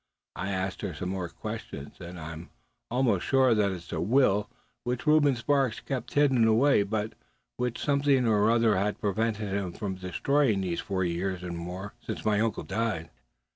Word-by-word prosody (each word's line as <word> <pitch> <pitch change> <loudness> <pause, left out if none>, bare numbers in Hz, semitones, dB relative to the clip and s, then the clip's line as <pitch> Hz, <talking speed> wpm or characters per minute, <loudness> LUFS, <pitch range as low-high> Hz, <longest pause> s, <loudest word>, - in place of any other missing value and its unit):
I 95 - -3
asked 95 -1 -2
her 90 - -4
some 90 +5 -4
more 95 -2 -3
questions, 70 -3 -7
and 85 0 -8
I'm 80 +1 -8 0.4
almost 120 -6 +2
sure 130 -2 +4
that 105 -2 +2
it's 85 -3 -8
a 80 - -1
will 105 0 +3 0.3
which 125 +2 -2
Reuben 150 -3 +5
Sparks 135 0 +1
kept 125 -3 -5
hidden 135 -6 +4
away, 115 +2 +4
but 105 +2 -2 0.4
which 125 -1 -1
something 140 -3 +2
or 105 -1 +4
other 115 -3 +4
has 100 +2 0
prevented 105 0 -1
him 95 -3 -2
from 100 -3 -3
destroying 105 +5 +1
these 90 -3 -2
four 95 -2 -1
years 90 +1 -2
and 90 -1 -4
more, 90 +4 -6
since - - -5
my 105 -1 +3
uncle 110 -1 0
died." 110 -8 -2
105 Hz, 175 wpm, -28 LUFS, 95-125 Hz, 0.4 s, Reuben